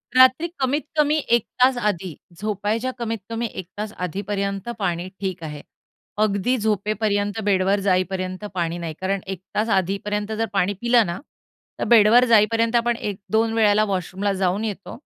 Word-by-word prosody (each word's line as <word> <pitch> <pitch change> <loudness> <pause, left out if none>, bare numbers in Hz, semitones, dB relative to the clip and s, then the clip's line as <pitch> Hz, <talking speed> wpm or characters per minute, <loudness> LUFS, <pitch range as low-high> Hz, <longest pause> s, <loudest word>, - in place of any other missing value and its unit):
रात्री 260 +6 +6
कमीत-कमी 295 +3 +1 0.2
एक 230 - -7 0.2
तास 255 0 +5
आधी, 190 -7 -2 0.2
झोपायच्या 215 +4 -1
कमीत-कमी 230 0 -3
एक 185 - -6
तास 210 0 -4
आधीपर्यंत 200 +3 -3
पाणी 175 -2 -1
ठीक 185 -4 -4
आहे. 150 -2 -6 0.6
अगदी 215 +3 +1
झोपेपर्यंत 210 0 0
बेडवर 195 0 +2
जाईपर्यंत 185 +1 0
पाणी 170 -1 -2
नाही. 165 -2 -5
कारण 195 +1 0
1 190 -2 -4 0.2
तास 220 +2 +1
आधीपर्यंत 205 +2 -1
जर 225 +1 0
पाणी 195 +1 +1
पिलं 235 -1 +4
ना 170 +1 -4 0.6
तर - - -1
बेडवर 235 +2 +6
जाईपर्यंत 230 0 +3
आपण 235 0 +2
1-2 215 +2 -1
वेळेला 215 -2 +4
वॉशरूमला 195 +1 -2
जाऊन 190 +2 0
येतो 200 0 -6
205 Hz, 145 wpm, -22 LUFS, 190-225 Hz, 0.6 s, रात्री